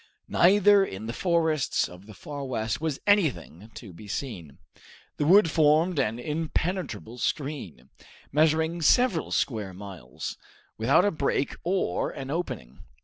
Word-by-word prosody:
Neither 200 +2 +5
in 100 - -6
the 115 - -4
forests 160 -2 +1
of 90 +3 -14
the 110 - -12
Far 145 +4 -7
West 115 -1 -3
was 160 -4 -2
anything 115 - +1
to 100 -7 -10
be 105 +5 -12
seen. 90 - -6 0.6
The 145 - 0
wood 185 -1 +6
formed 155 +2 +3
an 115 -4 0
impenetrable 155 - -3
screen, 120 - -4 0.4
measuring 160 +3 +2
several 190 - +3
square 105 -7 -2
miles, 90 -11 -8 0.4
without 130 - +3
a 205 - +2
break 140 -3 -1
or 180 - 0
an 135 0 -7
opening. 105 - -5
145 Hz, 135 wpm, -26 LUFS, 105-165 Hz, 0.6 s, wood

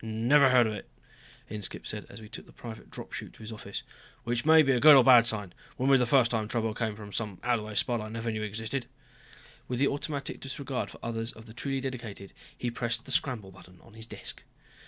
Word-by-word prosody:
"Never 120 +6 +4
heard 125 -2 +6
of 110 - -1
it," 105 - -8 0.6
Inskipp 105 -1 -4
said - - -4
as 100 - -10
we 110 - -10
took - - -8
the - - -15
private 115 -2 -10
drop - - -9
chute - - -6
to - - -19
his 110 +1 -7
office. 105 -2 -6 0.4
"Which 120 +3 -1
may 160 0 +8
be 135 - +3
a 125 - +3
good 150 +3 +10
or 135 - +9
a - - +2
bad 120 -2 +8
sign. 105 -5 -3 0.2
Wouldn't 135 +2 +3
be 135 - +7
the 125 - +2
first 120 -2 +4
time 110 -3 0
trouble 115 -1 -1
came 110 -1 -2
from 105 -1 -10
some 105 -5 -3
out 120 -1 +2
of 105 - -7
the - - -8
way 110 - -7
spot 115 +2 +1
I 110 - -6
never 115 +1 -5
even 110 0 -3
knew - - -2
existed." 110 +4 -4 0.8
With 125 - -2
the 140 +3 +3
automatic 140 0 -3
disregard 135 -1 -4
for - - -12
others 115 0 -3
of 110 - -13
the 110 - -11
truly 135 +3 -2
dedicated, 115 -7 -6 0.2
he 120 - -2
pressed 115 -1 -2
the 135 - -6
scramble 115 -9 0
button 90 -1 -16
on 115 - -18
his 110 0 -8
desk. - - -7
115 Hz, 250 wpm, -29 LUFS, 110-130 Hz, 0.8 s, good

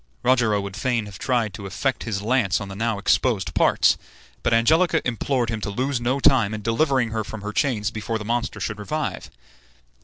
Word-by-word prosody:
Rogero 120 -5 +3
would 100 -1 -6
fain 115 0 0
have 100 -4 -10
tried 120 -5 0
the 100 - -8
effect 130 +7 -2
of - - -6
his 100 -3 -2
lance 110 -4 +2
on 100 -2 -6
the 95 - -7
now 115 +1 -1
exposed 105 -1 +1
parts, - - +3 0.4
but - - 0
Angelica 155 +11 +3
implored 125 0 0
him 110 -1 -3
to 105 - -3
lose 130 +4 -1
no 125 +3 0
time 125 -7 +4
in 105 - -7
delivering 125 +1 +1
her 110 -1 -1
from 110 0 -8
her 105 +1 -4
chains 110 -7 0
before 110 0 -3
the 105 - -7
monster 120 0 -2
should 105 -1 -4
revive. 150 +9 -3
115 Hz, 205 wpm, -23 LUFS, 105-130 Hz, 0.4 s, time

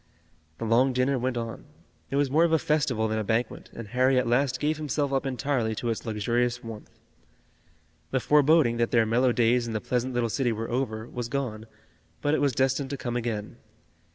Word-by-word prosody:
The 115 - -4
long 125 +4 +3
dinner 130 +1 +1
went 125 0 -1
on. 115 -1 -5 0.4
It - - -3
was 140 -2 +1
more 160 +4 +4
of 170 - +2
a 160 - +5
festival 140 -8 0
than 110 0 -1
a - - -1
banquet, 110 +2 -2
and 115 -3 -8
Harry 130 +2 +3
at 125 - +2
last 130 +2 +1
gave 150 +2 0
himself 145 -2 -1
up 135 0 0
entirely 130 -4 -1
to 120 +2 -2
its 115 - -5
luxurious 120 +3 0
warmth. 110 -2 -9 1.2
The 130 - 0
foreboding 145 -3 +4
that 115 0 +1
their 115 -2 +3
mellow 120 +3 +2
days 120 0 +2
in 115 - -4
the 110 - -1
pleasant 125 +2 -2
little 120 -1 +1
city 125 +1 0
were 115 +1 -4
over, 115 -3 -2
was 120 -1 -5
gone, 115 -6 -3 0.5
but 145 - 0
it - - +1
was 140 -2 +2
destined 135 +2 0
to 140 - -4
come 120 -2 -4
again. 115 -4 -3
125 Hz, 205 wpm, -27 LUFS, 115-135 Hz, 1.2 s, a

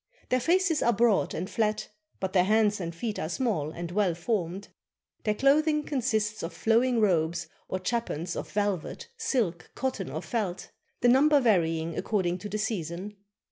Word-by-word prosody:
Their 255 - +3
faces 340 +3 +2
are 235 - +3
broad 225 -1 +2
and 180 +3 -3
flat, 215 -1 -1 0.3
but 190 -1 -3
their 180 -2 +4
hands 210 0 +3
and 170 -1 -4
feet 215 +4 -3
are 155 - -3
small 195 - -1
and 170 +2 -6
well 190 -3 +1
formed. 185 0 -2 0.6
Their 210 -1 +2
cloth 280 +6 +4
ing 300 -1 +2
consists 220 -7 -1
of 165 +1 -5
flowing 230 +5 +2
robes 170 -5 +1 0.2
or 185 - -2
chapans 185 -5 -2
of - - -5
velvet, 205 - -2
silk, 230 - -1
cotton, 260 0 -2
or - - -5
felt, 205 -7 -3 0.3
the 245 - +4
number 285 +4 +6
varying 165 -8 +1
according 185 -4 0
to 205 - -6
the 210 - -2
season. 200 -2 -3
210 Hz, 170 wpm, -28 LUFS, 175-240 Hz, 0.6 s, number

